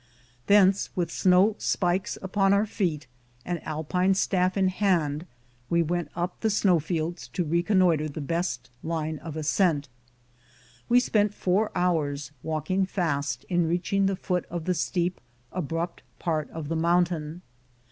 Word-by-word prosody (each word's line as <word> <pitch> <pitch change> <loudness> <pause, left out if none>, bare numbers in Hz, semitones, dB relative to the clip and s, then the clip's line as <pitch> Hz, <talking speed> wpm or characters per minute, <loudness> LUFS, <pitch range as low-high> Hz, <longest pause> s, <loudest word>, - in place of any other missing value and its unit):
Thence, 200 -1 +5
with 170 -2 -1
snow 185 +5 +4
spikes 180 0 0
upon 195 +1 +2
our 200 +2 +3
feet 170 - -2 0.4
and 175 -3 -3
Alpine 180 +5 0
staff 185 0 +1
in 190 -1 +3
hand, 175 -5 0 0.4
we 170 0 +3
went 170 -1 -2
up 175 +1 -3
the 220 - +1
snow 195 -4 +3
fields 160 -3 -3
to 175 +8 -2
reconnoiter 170 -1 +2
the 145 - -6
best 150 -5 -2
line 160 -1 -3
of 155 0 -7
ascent. 155 -2 +1 1.0
We 245 - +6
spent 210 -4 +1
four 195 +4 +1
hours, 150 -5 0
walking 160 +5 -1
fast, 140 -9 -2
in 175 -2 +1
reaching 185 +3 +1
the 195 - 0
foot 180 -1 -2
of 170 -2 -4
the 185 - +2
steep, 175 +1 -1 0.3
abrupt 170 0 -3 0.2
part 155 -4 -2
of 160 -2 -6
the 165 - -2
mountain. 170 0 0
175 Hz, 145 wpm, -26 LUFS, 155-185 Hz, 1.0 s, We